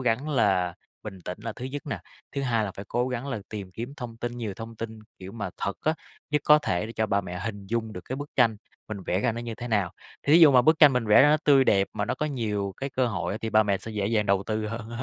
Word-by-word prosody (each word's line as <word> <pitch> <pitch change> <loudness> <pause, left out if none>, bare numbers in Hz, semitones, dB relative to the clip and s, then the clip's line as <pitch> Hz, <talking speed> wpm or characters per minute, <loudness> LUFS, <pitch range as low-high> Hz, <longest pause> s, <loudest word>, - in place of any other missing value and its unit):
gắng 125 +4 0
là 95 - +2 0.3
bình 100 -3 -8
tĩnh 90 - -5
là 115 - -4
thứ 125 - -8
nhất 140 +2 -5
nè. - - -3 0.3
Thứ 140 - -2
2 115 -4 +1
là 100 - -3
phải 100 - -8
cố 125 +1 0
gắng 125 +1 -3
là 130 - -2
tìm 100 -4 -6
kiếm 120 +8 -6
thông 120 -3 -7
tin 120 +1 -4
nhiều 110 -5 -4
thông 115 +1 -8
tin, 110 0 -6 0.2
kiểu, 95 +1 -9
mà 105 -4 -4
thật 100 - -3
á, 155 - +1 0.4
nhất 150 0 +2
có 150 0 +7
thể 90 -9 -1
để 115 - -8
cho 110 -1 0
ba 100 0 +1
mẹ 90 -2 -6
hình 100 -3 -5
dung 110 +1 -2
được 90 - -6
cái 130 - -4
bức 145 +1 -6
tranh 115 -4 +4 0.3
mình 105 -3 -5
vẽ 90 +2 +1
ra 115 - +1
nó 115 - -5
như 115 -1 -5
thế 120 +2 -7
nào. 100 -6 +1 0.3
Thí 150 +4 +6
dụ 155 - +9
mà 125 -2 +6
bức 155 +3 +4
tranh 150 -4 +8
mình 125 -3 0
vẽ 105 - +7
ra 145 - +6
nó 155 - +5
tươi 140 -2 +6
đẹp 100 -5 +3
mà 105 - -1
nó - - -1
có 150 - -2
nhiều 105 -8 -2
cái 135 0 -4
cơ 130 -1 +1
hội 105 -4 -2
á, - - -4
thì 110 - -3
ba 110 0 +5
mẹ 100 -2 0
sẽ 115 - -8
dễ 105 -2 -1
dàng 110 -2 +1
đầu 100 0 +2
tư 110 0 -1
hơn. 110 0 -5
115 Hz, 295 wpm, -26 LUFS, 100-125 Hz, 0.4 s, dụ